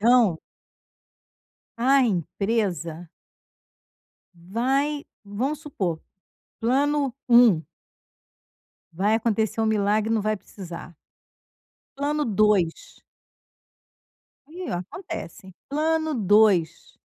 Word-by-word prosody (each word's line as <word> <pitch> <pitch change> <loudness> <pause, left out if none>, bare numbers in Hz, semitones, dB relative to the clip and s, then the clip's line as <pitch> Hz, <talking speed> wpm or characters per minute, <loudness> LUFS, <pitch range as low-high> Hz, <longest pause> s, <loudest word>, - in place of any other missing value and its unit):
Então 225 -7 +4 1.4
a 270 +2 +4
empresa 180 -4 -2 1.3
vai 265 - -1 0.2
vamos 260 +9 -3
supor, 185 - -3 0.6
plano 275 +2 +1
1 235 -9 +6 1.3
vai 200 +6 +1
acontecer 225 -1 0
um 220 - +2
milagre 215 +1 +1
e - - +2
não 220 - 0
vai 215 +1 0
precisar 175 -3 -10 1.0
plano 295 +1 0
2. 210 -6 +1 1.5
E, 350 +4 -7
acontece 190 - -6
hein, 190 - -13
plano 315 +2 0
2, 205 - +2
220 Hz, 80 wpm, -24 LUFS, 190-275 Hz, 1.5 s, 1